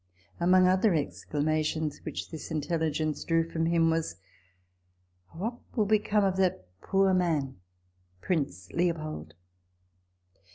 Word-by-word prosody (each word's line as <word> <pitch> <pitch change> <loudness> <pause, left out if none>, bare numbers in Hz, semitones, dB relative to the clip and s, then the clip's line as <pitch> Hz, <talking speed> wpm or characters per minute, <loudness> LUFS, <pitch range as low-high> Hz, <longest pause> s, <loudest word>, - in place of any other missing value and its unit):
Among 180 +1 +5
other 185 +1 +3
exclamations 155 - -1
which - - -5
this 160 - -7
intelligence 155 -1 -1
drew 165 -1 +1
from 165 0 -1
him, 165 -1 +3
was, 160 - -1 0.6
" 90 0 -37
Oh, - - -10
what 230 +7 -3 0.2
will 215 - +3
become 210 0 +2
of 190 -1 +1
that 185 - +1 0.2
poor 195 -1 +2
man 160 -7 0 0.6
(Prince 95 - -2
Leo 170 0 +1
pold) 155 - -7
165 Hz, 125 wpm, -29 LUFS, 145-185 Hz, 0.6 s, Among